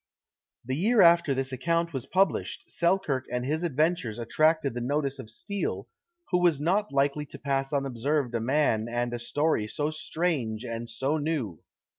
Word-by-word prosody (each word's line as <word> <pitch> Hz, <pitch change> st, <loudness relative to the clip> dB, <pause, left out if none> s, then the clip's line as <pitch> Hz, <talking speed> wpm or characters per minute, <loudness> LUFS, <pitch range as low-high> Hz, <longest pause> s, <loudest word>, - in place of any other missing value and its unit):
The 130 Hz, +2 st, -2 dB
year 215 Hz, -, +3 dB
after 170 Hz, -4 st, +5 dB
this 135 Hz, 0 st, -2 dB
account 165 Hz, +6 st, 0 dB
was 135 Hz, -3 st, -4 dB
published, 190 Hz, -2 st, +1 dB
Selkirk 170 Hz, -7 st, 0 dB
and 125 Hz, 0 st, -1 dB
his 155 Hz, +5 st, -1 dB
adventures 155 Hz, -7 st, 0 dB
attracted 155 Hz, +4 st, +2 dB
the 120 Hz, -, -4 dB
notice 140 Hz, +2 st, -1 dB
of 110 Hz, -, -8 dB
Steele, 140 Hz, -, -3 dB, 0.4 s
who 180 Hz, -, +3 dB
was 175 Hz, -5 st, +3 dB
not 195 Hz, +7 st, +1 dB
likely 140 Hz, +2 st, +1 dB
to 140 Hz, -, -9 dB
pass 135 Hz, -1 st, -1 dB
unobserved 135 Hz, -1 st, -1 dB
a 115 Hz, -, 0 dB
man 120 Hz, -3 st, +1 dB
and 120 Hz, 0 st, -1 dB
a 120 Hz, -, -3 dB
story 145 Hz, -2 st, 0 dB
so 145 Hz, +7 st, -1 dB
strange 155 Hz, -9 st, -2 dB
and 115 Hz, 0 st, -5 dB
so 135 Hz, +6 st, -1 dB
new. 145 Hz, -, -2 dB
140 Hz, 165 wpm, -28 LUFS, 120-165 Hz, 0.4 s, after